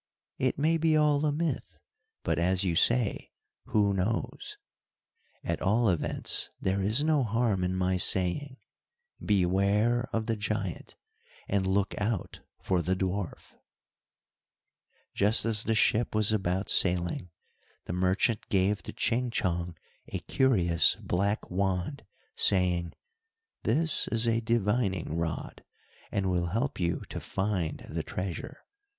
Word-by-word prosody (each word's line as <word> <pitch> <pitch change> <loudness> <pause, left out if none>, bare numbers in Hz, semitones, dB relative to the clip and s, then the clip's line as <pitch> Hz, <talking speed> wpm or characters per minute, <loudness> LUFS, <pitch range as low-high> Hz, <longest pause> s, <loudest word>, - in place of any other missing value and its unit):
"It 130 -1 0
may 160 +3 +2
be 160 -1 +2
all 150 0 +3
a - - +1
myth, 155 -2 -3 0.5
but 80 -1 0
as 90 +2 +2
you 90 -4 0
say 115 +4 +1 0.4
'who 100 -2 +2
knows!' 100 +4 -3 0.9
At - - -3
all 110 +3 +2
events 85 -4 0
there 95 +1 0
is 110 +9 +2
no 155 -3 +2
harm 110 -4 0
in 90 +1 -1
my 95 0 +1
saying, 95 +10 +1 0.7
beware 105 +5 +2
of 110 -1 -1
the 115 0 0
giant, 105 -4 -4 0.5
and 95 -1 0
look 100 +1 +1
out 105 -3 -2 0.2
for 90 -2 +1
the 90 +3 0
dwarf." 95 0 -4 1.6
Just 105 +4 +2
as 110 -1 +3
the 115 - +1
ship 110 +1 +2
was 110 -1 +3
about 95 -2 -1
sailing, 90 -1 +1 0.6
the - - -4
merchant 95 +5 0
gave 100 +1 +1
to - - -8
Ching 125 +1 0
Chong 85 -6 -2 0.3
a - - -4
curious 90 -11 +3
black 100 +4 -1
wand, 95 +7 -2 0.3
saying, 90 -3 +3 0.7
"this 155 +8 +2
is 115 0 +1
a 115 0 +2
divining 105 -7 0
rod, 85 -2 -4 0.5
and 100 -1 -1
will 90 -1 0
help 115 +9 -2
you 85 -1 -1
to - - -5
find 95 -5 -3
the - - -3
treasure. 115 - -6
100 Hz, 130 wpm, -29 LUFS, 90-115 Hz, 1.6 s, all